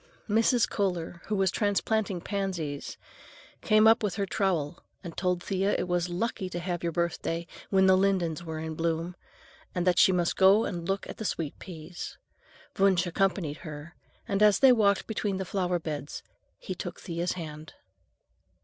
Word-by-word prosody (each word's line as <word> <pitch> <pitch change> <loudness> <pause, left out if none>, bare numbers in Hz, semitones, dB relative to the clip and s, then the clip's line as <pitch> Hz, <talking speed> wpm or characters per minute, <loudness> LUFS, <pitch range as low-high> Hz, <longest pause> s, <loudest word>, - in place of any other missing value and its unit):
Mrs. 225 +2 +3
Kohler, 175 -4 -2
who 215 - 0
was 190 -2 +2
transplanting 205 -2 0
pansies, 180 -8 -3 0.6
came 215 -2 +4
up 225 +1 +6
with 210 -3 -1
her 200 -1 0
trowel 185 -7 -1 0.2
and 170 -3 -7
told 180 -1 0
Thea 195 +1 0
it - - -2
was 175 0 0
lucky 190 +1 -2
to 175 - -4
have 175 -1 -3
your 170 - -1
birthday 170 0 -2 0.2
when 190 -1 +4
the 190 0 +6
lindens 185 -4 +1
were 160 -2 -5
in 160 0 -4
bloom, 165 +2 -2 0.6
and 180 -1 0
that 180 -1 +3
she - - +7
must 175 -2 +1
go 195 +4 +6
and 170 -3 -4
look 195 0 -1
at - - -8
the - - -5
sweet 165 -8 -3
peas. 175 -1 -8 0.6
Wunsch 190 -2 +4
accompanied 175 -4 0
her, 155 +1 -9 0.3
and 200 -2 0
as 210 -1 +6
they 265 -1 +7
walked 205 -5 +3
between 205 -3 -2
the 190 - -3
flower 180 -1 0
beds 150 -3 -5 0.3
he - - -5
took - - -6
Thea's 170 0 -2
hand. 155 -3 -8
180 Hz, 170 wpm, -28 LUFS, 170-200 Hz, 0.6 s, she